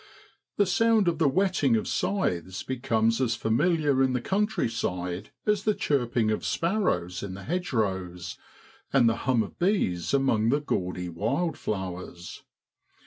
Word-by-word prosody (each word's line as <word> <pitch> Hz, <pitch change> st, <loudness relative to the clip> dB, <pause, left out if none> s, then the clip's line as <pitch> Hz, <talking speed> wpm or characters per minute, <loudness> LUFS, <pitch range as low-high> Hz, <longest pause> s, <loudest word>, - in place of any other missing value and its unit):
The 205 Hz, -, +4 dB
sound 220 Hz, +2 st, +3 dB
of 165 Hz, -2 st, +1 dB
the 155 Hz, -4 st, +4 dB
whetting 175 Hz, -6 st, +2 dB
of 110 Hz, -, -1 dB
scythes 95 Hz, -, -1 dB
becomes 115 Hz, -2 st, 0 dB
as 115 Hz, -3 st, +1 dB
familiar 140 Hz, +5 st, +2 dB
in 130 Hz, -1 st, +3 dB
the 125 Hz, -, +1 dB
countryside 115 Hz, -, -1 dB, 0.2 s
as 210 Hz, -2 st, +1 dB
the 215 Hz, -1 st, +2 dB
chirping 120 Hz, -5 st, +1 dB
of 110 Hz, -, -2 dB
sparrows 165 Hz, -, 0 dB
in 95 Hz, -2 st, -5 dB
the 100 Hz, -, -9 dB
hedge 175 Hz, -, -2 dB
rows, 95 Hz, -7 st, -2 dB, 0.6 s
and 130 Hz, -4 st, +5 dB
the 115 Hz, -, +3 dB
hum 120 Hz, -4 st, +4 dB
of -, -, -11 dB
bees 175 Hz, -, +1 dB
among 125 Hz, -5 st, +2 dB
the 145 Hz, +4 st, +3 dB
gaudy 90 Hz, -10 st, -2 dB
wildflowers. 95 Hz, -, -3 dB
120 Hz, 140 wpm, -27 LUFS, -, 0.6 s, and